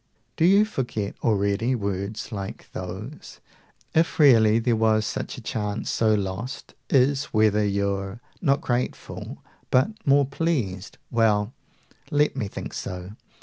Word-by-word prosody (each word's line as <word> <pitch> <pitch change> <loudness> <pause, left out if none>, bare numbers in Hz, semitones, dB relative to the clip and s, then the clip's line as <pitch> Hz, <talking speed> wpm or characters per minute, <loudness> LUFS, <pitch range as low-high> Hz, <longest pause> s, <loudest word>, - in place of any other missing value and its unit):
Do 165 - +2
you 200 +4 +6
forget 120 - -3
already 105 +3 +1
words 100 -1 -3
like 100 -2 -6
those?) 95 +10 -7 0.5
200 - - +4
If 165 - 0
really 115 -7 +6
there 115 0 +2
was 110 -1 +2
such - - -4
a - - -8
chance, 105 -1 -3
so 110 -1 +3
lost 100 +7 -4 0.2
Is, 135 +1 +3
whether 110 -1 +2
you're 100 +1 -1 0.2
not 140 -4 +2
grateful 125 0 -3 0.3
but 130 +12 +3
more 140 0 +4
pleased. 130 - -2
Well, 110 -1 +2 0.6
let 150 0 +2
me 120 -7 -2
think - - -7
so. 90 0 -6
110 Hz, 135 wpm, -25 LUFS, 100-135 Hz, 0.6 s, you